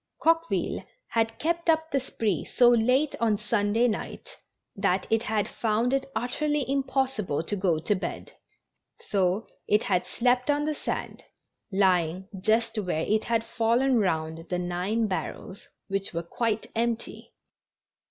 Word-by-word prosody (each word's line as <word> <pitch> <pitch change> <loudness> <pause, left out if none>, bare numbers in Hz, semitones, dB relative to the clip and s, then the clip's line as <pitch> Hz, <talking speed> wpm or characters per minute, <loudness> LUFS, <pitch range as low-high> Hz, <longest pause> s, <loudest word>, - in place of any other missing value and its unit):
Coqueville 330 +1 +1 0.3
had 225 0 0
kept 335 +2 -1
up 320 0 +2
the 275 - +2
spree 220 - -1
so 245 -1 +4
late 250 +5 +3
on 220 -3 +2
Sunday 210 +2 +1
night 220 - -5 0.4
that - - +1
it 225 0 +3
had 215 -2 0
found 230 +3 0
it 275 0 0
utterly 295 +3 0
impossible 265 - 0
to 205 - -1
go 185 -5 +1
to 210 - +1
bed, 185 - -5 0.7
so 195 +2 0 0.2
it 210 +1 +3
had 180 -3 0
slept 250 +2 +1
on 290 0 +2
the 305 - 0
sand, - - -4 0.5
lying 185 -2 +2
just 225 +3 +1
where 175 -5 -1
it 215 +1 +1
had 230 -1 +1
fallen 235 +3 +2
round 160 -3 -1
the 180 - 0
nine 180 +6 -1
barrels 190 0 -5 0.2
which 195 -3 -2
were 170 - -1
quite 220 +5 -2
empty! 235 0 -3
225 Hz, 145 wpm, -27 LUFS, 195-250 Hz, 0.7 s, so